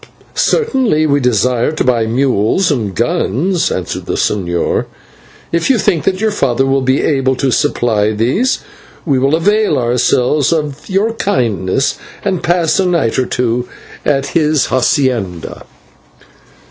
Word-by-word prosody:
"Certainly 260 - +1
we 145 -1 +2
desire 125 +1 +1
to 155 - -1
buy 120 -3 +1
mules 130 - +1
and 110 -9 -2
guns," 165 - 0
answered 90 - -4
the - - -2
señor, 85 -4 -1
"and - - -4 0.7
if 170 +6 0
you 265 - +4
think 190 -7 0
that 190 -1 0
your 220 0 +1
father 135 - 0
will 135 0 +1
be 130 +1 +1
able 135 -3 +1
to 130 0 0
supply 115 -7 +1
these, 125 - 0 0.4
we 140 -5 +1
will 135 +4 +2
avail 205 -1 +2
ourselves 125 +4 +1
of 150 -2 -3
your 200 +4 +1
kindness 115 - -1 0.3
and 185 -3 0
pass 175 0 +1
a 190 - +2
night 165 -10 +1
or 130 - 0
two 125 0 -1 0.4
at 135 -1 +1
his 155 -3 +1
/hacienda 125 - -1
135 Hz, 145 wpm, -14 LUFS, 120-170 Hz, 0.7 s, you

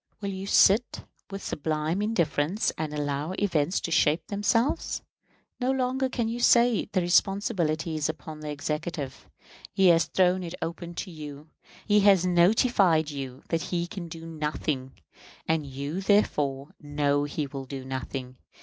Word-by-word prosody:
Will 200 -2 -3
you 190 +1 -6
sit 210 +4 +4 0.3
with 195 0 -7
sublime 155 +4 -1
indifference 175 -3 0
and 155 -1 -3
allow 145 +2 -2
events 180 -4 0
to 170 - -4
shape 165 +5 +2
themselves? 210 +6 0 0.6
No 250 0 0
longer 260 0 0
can 235 -3 -1
you 230 +2 -3
say 240 -2 +4
the 185 - +1
responsibility 175 -3 +1
is 155 -1 -1
upon 155 -1 -7
the 155 0 -6
Executive. 150 -1 -4 0.4
He 190 -2 +4
has 165 -1 +5
thrown 185 0 +2
it 175 0 -6
upon 170 +1 -5
you. 155 -3 -9 0.3
He 210 -1 +4
has 195 -3 +5
notified 180 - +3
you 135 -2 -7
that 165 -1 0
he 170 0 -2
can 175 -1 -7
do 165 0 -9
nothing; 150 -4 -3 0.5
and 160 -2 0
you 140 +7 -4
therefore 145 -9 +1
know 145 -1 0
he 145 +1 -3
will 135 -1 -7
do 130 0 -7
nothing. 130 -1 -5
165 Hz, 150 wpm, -27 LUFS, 150-195 Hz, 0.6 s, has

